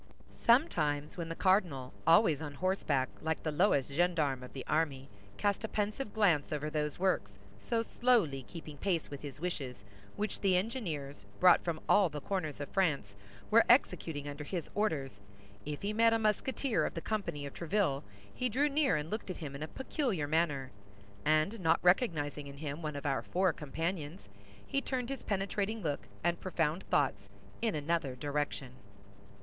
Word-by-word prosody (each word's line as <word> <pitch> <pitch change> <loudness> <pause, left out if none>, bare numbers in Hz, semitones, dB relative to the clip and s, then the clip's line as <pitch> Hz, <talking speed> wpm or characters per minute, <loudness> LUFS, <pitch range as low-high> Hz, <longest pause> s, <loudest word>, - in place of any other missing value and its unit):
Sometimes 155 - +3
when 170 -2 -4
the 165 - -3
cardinal, 175 -10 +2
always 165 -3 +5
on 145 -2 -5
horseback, 155 -6 +1
like 160 0 -2
the 155 - 0
lowest 145 -5 +2
gendarme 155 -4 +1
of 125 - -9
the 135 - -6
army, 145 -4 0 0.3
cast 205 +1 0
a - - -1
pensive 210 +3 -2
glance 180 -10 +2
over 150 0 -2
those 150 -1 -1
works, 140 - 0 0.2
so 230 - 0
slowly 225 - +2
keeping 155 +1 -10
pace 170 -2 -1
with 140 - -6
his 145 -2 -8
wishes, 135 - -4 0.3
which 210 +1 -3
the 190 -2 +3
engineers, 160 - -3
brought 180 -1 +7
from 165 -2 -2
all 200 -4 +5
the 150 - -5
corners 155 -3 -3
of 145 - -4
France, 145 - 0 0.4
were 230 +2 +7
executing 165 - +3
under 145 +1 -5
his 170 +1 -4
orders, 140 - -1 0.5
if 150 +3 -4
he 205 +1 -1
met 230 +1 +5
a - - +4
Musketeer 225 +4 +1
of - - -2
the - - -3
company 195 -9 -3
of 140 - -7
Tréville, 170 -5 0 0.3
he 250 - -1
drew 280 +6 +2
near 285 -1 +3
and 150 +1 -3
looked 215 -2 -4
at 185 - -4
him 145 -4 -6
in 140 - -7
a 155 - -3
peculiar 255 - -2
manner, 145 -4 0 0.5
and 155 +8 +2
not 160 -3 +4
recognizing 155 - +2
in 140 0 -10
him 145 +1 -5
one 155 -2 -3
of 145 - -6
our 135 -2 +1
four 185 -1 +1
companions, 165 - -4 0.4
he 275 - 0
turned 255 -3 -2
his 275 -2 -4
penetrating 200 +2 -1
look 145 -3 -2 0.2
and 175 0 +1
profound 170 -1 0
thoughts 100 -8 +1 0.3
in 225 -5 +1
another 150 -3 -1
direction. 145 -1 -2
165 Hz, 175 wpm, -33 LUFS, 145-200 Hz, 0.5 s, brought